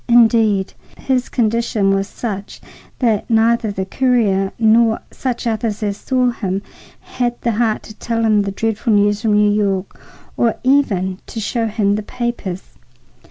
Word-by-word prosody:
Indeed, 225 -4 +4 0.2
his 255 -2 -1
condition 225 -3 +1
was 195 0 0
such 205 -4 -6 0.4
that 225 -4 0
neither 225 0 +2
the 190 -2 -3
courier 205 -5 +1
nor 225 0 +4
such 250 -3 -3
others 220 -2 -2
as 205 -1 -1
saw 255 0 +1
him 195 -4 -3 0.4
had 240 -1 -3
the 235 - 0
heart 225 0 0
to 215 - -11
tell 230 +1 -2
him 215 -2 +3
the 200 0 -2
dreadful 225 +2 -1
news 205 0 +2
from 220 -3 +1
New 210 0 +4
York, 200 -2 -1 0.3
or 230 -2 +1
even 195 -9 +1
to 225 - -6
show 225 +2 -1
him 205 -2 +1
the 210 - -1
papers. 210 -5 -4
220 Hz, 155 wpm, -18 LUFS, 200-235 Hz, 0.4 s, Indeed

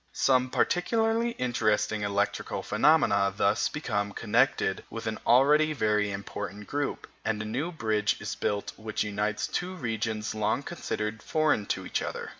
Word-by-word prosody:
Some 130 -1 +3
particularly 225 - +1
interesting 110 - 0
electrical 100 0 -1
phenomena 100 -11 +3
thus 100 +2 +2
become 105 -9 -2
connected 115 -2 +1
with 115 - -6
an 110 -1 -3
already 150 +5 +5
very 105 -5 +1
important 100 0 -6
group, 145 +3 -3 0.2
and 110 -1 -1
a 110 - -4
new 130 +11 -2
bridge 110 -8 0
is - - -4
built 100 0 -2
which 110 -1 -2
unites 105 +1 -1
two 185 +1 -3
regions 110 - -2
long 110 +5 0
considered 110 -10 -4
foreign 155 -10 +1
to - - -2
each - - -1
other. - - -4
110 Hz, 145 wpm, -28 LUFS, 105-145 Hz, 0.2 s, already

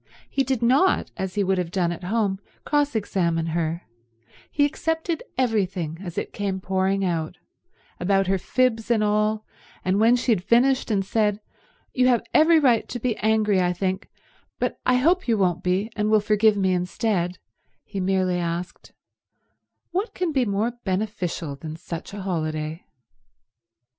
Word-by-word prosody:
He 275 - 0
did 260 -2 -1
not, 270 +11 +3
as 190 -2 -4
he 205 - +2
would 190 -1 +1
have 175 -2 -2
done 175 -1 0
at 175 +1 -6
home, 200 -1 0 0.3
cross 290 -3 +1
examine 170 -6 0
her; 165 +1 -1 0.7
he 290 - +2
accepted 325 +2 -2 0.2
everything 190 -10 0
as 175 -4 -7
it - - -3
came 195 -2 -2
pouring 190 +1 0
out, 165 -3 -2 0.6
about 195 +2 +2
her 190 0 +1
fibs 240 0 0
and 225 -3 +3
all, 215 +1 +1 0.4
and 185 +2 +2
when 230 +3 +5
she 245 0 0
had 180 -5 +1
finished 255 +5 +3
and 195 -3 +1
said, 210 0 +1 0.5
"You 255 0 +3
have 245 -2 +3
every 320 +2 +6
right 245 -6 +3
to 245 - -4
be 235 -1 0
angry, 215 -3 +2
I 180 0 +1
think, 185 +1 -2 0.5
but - - -2
I 255 - +5
hope 335 +8 +2
you 230 -2 +2
won't 180 -3 +1
be 190 +4 0
and 210 0 0
will 215 0 +5
forgive 210 0 +3
me 190 -2 +2
instead," 180 0 -1 0.5
he 200 -2 -6
merely 185 -1 +1
asked, 175 +1 -5 1.0
"What 390 +6 -2
can 360 -3 -1
be 265 -4 +2
more 210 +3 0
beneficial 185 -6 -2
than 155 +2 -7
such 165 +1 -7
a 200 -1 -7
holiday?" 155 -3 -3
200 Hz, 165 wpm, -24 LUFS, 180-235 Hz, 1.0 s, every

